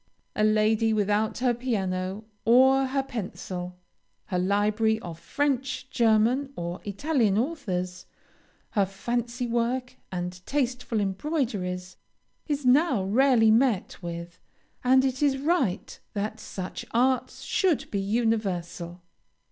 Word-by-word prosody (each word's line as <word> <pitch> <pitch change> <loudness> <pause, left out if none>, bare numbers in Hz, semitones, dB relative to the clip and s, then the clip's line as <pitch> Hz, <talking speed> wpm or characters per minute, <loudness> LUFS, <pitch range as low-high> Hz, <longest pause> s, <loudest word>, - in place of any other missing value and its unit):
A 215 - +1
lady 215 +1 +3
without 210 +1 +1
her 245 -1 +2
piano, 195 -4 -2 0.2
or 265 +3 +5
her 270 +1 0
pencil, 185 -7 -6 0.5
her 180 -3 -1
library 210 +3 +2
of 170 -2 -8
French, 270 +1 -1
German, 235 +4 +3
or 170 +1 -5
Italian 220 -1 +1
authors, 190 - -2 0.6
her 200 -2 +2
fancy 240 +5 -2
work 245 +2 -1
and 180 0 -4
tasteful 250 -5 -1
embroideries, 195 - -2 0.5
is 290 -3 -2
now 260 - +4
rarely 225 +2 +4
met 225 -5 +2
with, 170 0 -7 0.4
and 260 +1 +5
it 260 0 -1
is 280 -2 +3
right 275 - 0
that 215 +2 -3
such 185 -3 -6
arts 255 +2 +1
should 365 -7 +1
be 200 - 0
universal. 195 -5 -1
220 Hz, 115 wpm, -27 LUFS, 190-260 Hz, 0.6 s, or